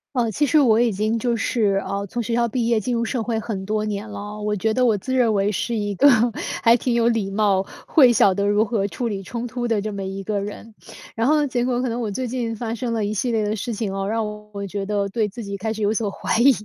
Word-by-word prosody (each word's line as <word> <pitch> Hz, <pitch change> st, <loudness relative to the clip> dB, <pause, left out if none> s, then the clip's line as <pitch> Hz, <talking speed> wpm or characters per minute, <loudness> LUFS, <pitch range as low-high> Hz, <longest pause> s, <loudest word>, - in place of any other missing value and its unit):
呃， 235 Hz, -3 st, +1 dB
其 295 Hz, -, -1 dB
实 310 Hz, -, +4 dB
我 235 Hz, -5 st, +4 dB
已 240 Hz, -1 st, +3 dB
经 215 Hz, +3 st, 0 dB
就 235 Hz, 0 st, 0 dB
是， 210 Hz, -4 st, +1 dB
呃， 200 Hz, 0 st, -2 dB
从 240 Hz, +4 st, -3 dB
学 230 Hz, -, -3 dB
校 235 Hz, 0 st, +2 dB
毕 235 Hz, +1 st, -1 dB
业 230 Hz, -2 st, +3 dB
进 240 Hz, +4 st, -2 dB
入 235 Hz, 0 st, 0 dB
社 245 Hz, +1 st, -2 dB
会 225 Hz, 0 st, -1 dB
很 205 Hz, -3 st, -4 dB
多 215 Hz, +2 st, -1 dB
年 210 Hz, +1 st, -4 dB
了 210 Hz, -, -7 dB
哦， 210 Hz, +1 st, -7 dB
我 210 Hz, 0 st, -1 dB
觉 220 Hz, +2 st, 0 dB
得 255 Hz, -, +2 dB
我 225 Hz, -4 st, +3 dB
自 260 Hz, +7 st, -4 dB
认 240 Hz, -4 st, +3 dB
为 200 Hz, +1 st, +2 dB
是 235 Hz, +5 st, -2 dB
一 205 Hz, -2 st, -1 dB
个 285 Hz, +9 st, +6 dB, 0.5 s
还 230 Hz, 0 st, +7 dB
挺 245 Hz, 0 st, 0 dB
有 235 Hz, 0 st, +3 dB
礼 225 Hz, -4 st, +1 dB
貌， 200 Hz, -1 st, +2 dB, 0.3 s
会 265 Hz, -7 st, +6 dB
晓 200 Hz, -4 st, +4 dB
得 200 Hz, +1 st, 0 dB
如 205 Hz, +2 st, +3 dB
何 210 Hz, -3 st, 0 dB
处 220 Hz, +6 st, -3 dB
理 200 Hz, -3 st, -3 dB
冲 235 Hz, +5 st, -5 dB
突 245 Hz, 0 st, -3 dB
的 225 Hz, -3 st, +1 dB
这 210 Hz, +1 st, -4 dB
么 195 Hz, -1 st, -4 dB
一 195 Hz, +1 st, -5 dB
个 205 Hz, +1 st, -1 dB
人。 210 Hz, +2 st, -8 dB, 0.4 s
然 230 Hz, +2 st, +1 dB
后 305 Hz, -, +4 dB
呢， 290 Hz, -, +1 dB
结 245 Hz, -2 st, -1 dB
果 245 Hz, -1 st, 0 dB
可 255 Hz, -, 0 dB
能 235 Hz, +1 st, -3 dB
我 220 Hz, -, -2 dB
最 250 Hz, +5 st, -3 dB
近 235 Hz, -2 st, -3 dB
发 225 Hz, 0 st, -4 dB
生 235 Hz, +1 st, -3 dB
了 225 Hz, -2 st, 0 dB
一 205 Hz, -, -2 dB
系 240 Hz, +4 st, -1 dB
列 220 Hz, -2 st, +1 dB
的 210 Hz, +1 st, -1 dB
事 230 Hz, +3 st, -4 dB
情 210 Hz, -3 st, -3 dB
啊， 195 Hz, 0 st, -2 dB
让 220 Hz, +1 st, 0 dB, 0.3 s
我 200 Hz, -1 st, -5 dB
觉 200 Hz, +1 st, -4 dB
得 200 Hz, 0 st, -1 dB
对 215 Hz, +1 st, 0 dB
自 235 Hz, +4 st, -8 dB
己 200 Hz, -1 st, -5 dB
开 220 Hz, +3 st, -3 dB
始 215 Hz, -1 st, -4 dB
有 205 Hz, +1 st, +2 dB
所 220 Hz, -2 st, -1 dB
怀 -, -, -2 dB
疑， 270 Hz, +4 st, +7 dB
220 Hz, 310 characters per minute, -22 LUFS, 205-235 Hz, 0.5 s, 还